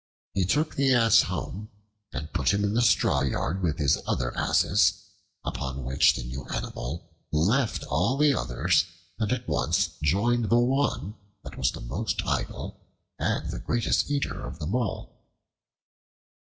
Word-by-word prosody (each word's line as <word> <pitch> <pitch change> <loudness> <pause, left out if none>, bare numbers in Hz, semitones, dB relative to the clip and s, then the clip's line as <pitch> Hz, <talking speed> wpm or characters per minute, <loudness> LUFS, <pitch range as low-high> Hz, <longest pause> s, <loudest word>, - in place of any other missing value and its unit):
He 95 -2 +1
took 150 - +1
the 135 -1 +3
Ass 115 -3 +6
home 105 +2 -5 0.4
and 75 +4 -6
put 70 -7 +2
him 100 - 0
in 100 0 0
the 120 - +2
straw 105 - +3
yard 75 +7 -1
with 80 -3 0
his 70 -3 +2
other - - -1
Asses, - - +3 0.5
upon 65 0 -4
which 65 +2 +4
the - - -4
new 65 +2 -6
animal 80 +6 -5 0.2
left 105 - +1
all 90 - 0
the 150 0 +4
others 110 - +1 0.3
and 110 -2 0
at 125 -1 -2
once - - +1
joined 115 +10 +2
the 120 - +5
one 130 -3 +1 0.3
that - - -9
was 65 - -1
most - - -3
idle - - -3 0.4
and - - -1
the - - -5
greatest 120 +3 0
eater 145 -1 -1
of - - -7
them 80 +4 -4
all. 120 -5 -3
100 Hz, 155 wpm, -27 LUFS, 75-120 Hz, 0.5 s, Ass